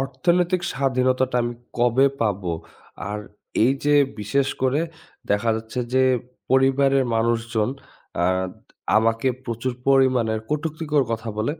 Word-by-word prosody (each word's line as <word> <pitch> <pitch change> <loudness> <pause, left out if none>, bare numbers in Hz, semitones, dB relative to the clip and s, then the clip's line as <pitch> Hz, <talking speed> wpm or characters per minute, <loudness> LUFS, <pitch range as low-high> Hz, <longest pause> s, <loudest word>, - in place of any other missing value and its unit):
অর্থনৈতিক 170 +7 +1
স্বাধীনতাটা 130 -1 +1
আমি 120 0 -3 0.2
কবে 120 +3 +4
পাবো? 100 -5 0 0.6
আর 105 +1 -3 0.5
এইযে 140 +4 +2 0.3
বিশেষ 135 +7 +1
করে 135 +3 +2 0.5
দেখা 105 +3 +2
যাচ্ছে 110 +2 -6 0.2
যে 130 - +5 0.5
পরিবারের 135 +1 +4
মানুষজন 115 -1 0 0.6
আদ 95 0 0 0.4
আমাকে 115 +3 +2 0.2
প্রচুর 120 +1 -3 0.2
পরিমাণের 130 -5 +3
কটুক্তিকর 150 -1 0
কথা 115 0 -4
বলে 110 +6 0
130 Hz, 110 wpm, -23 LUFS, 115-135 Hz, 0.6 s, যে